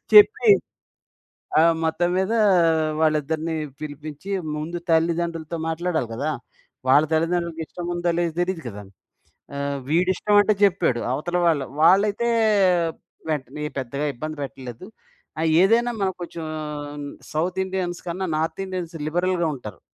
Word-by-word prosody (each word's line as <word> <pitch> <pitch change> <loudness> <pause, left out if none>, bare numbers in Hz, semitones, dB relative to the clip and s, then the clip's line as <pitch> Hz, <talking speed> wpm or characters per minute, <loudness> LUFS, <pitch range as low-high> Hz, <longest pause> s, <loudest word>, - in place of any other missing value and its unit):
చెప్పి 425 +1 +7 1.1
ఆ - - +6 0.2
మొత్తం 165 +2 +1
మీద 190 +3 +1 0.7
వాళ్ళిద్దరిని 160 +1 +1 0.3
పిలిపించి 155 +4 -7 0.3
ముందు 165 +3 -4
తల్లిదండ్రులతో 165 0 0
మాట్లాడాలి 165 -5 -1
కదా! 145 +7 -1 0.6
వాళ్ళ 145 +3 +6
తల్లిదండ్రులకి 165 +1 0
ఇష్టం 175 +1 -7
ఉందో 175 0 0
లేదో 170 -1 0
తెలీదు 175 -1 -1
కదా! 105 -2 -8 0.8
ఆహ్, 140 0 -2
వీడి 175 +4 +3
ఇష్టం 210 +3 +1
అంటే 210 +1 +3
చెప్పాడు 175 -11 +3
అవతల 175 +7 -1
వాళ్ళు 150 -5 +2 0.2
వాళ్ళైతే 200 +7 +4 1.0
వెంటనే 150 -1 -3 0.2
పెద్దగా 140 +3 -3
ఇబ్బంది 155 +5 -6
పెట్టలేదు. 130 +1 -8 0.5
ఆ - - 0 0.2
ఏదైనా 230 +5 +4
మనం 190 -1 +1
కొంచెం 170 -1 -6 0.9
సౌత్ 175 +4 -1
ఇండియన్స్ 185 -2 -3
కన్నా 180 +2 -2
నార్త్ 160 +3 -2
ఇండియన్స్ 180 -3 -5
లిబరల్‌గా 175 +1 +1
ఉంటారు. 105 -8 -9
165 Hz, 120 wpm, -23 LUFS, 150-180 Hz, 1.1 s, చెప్పి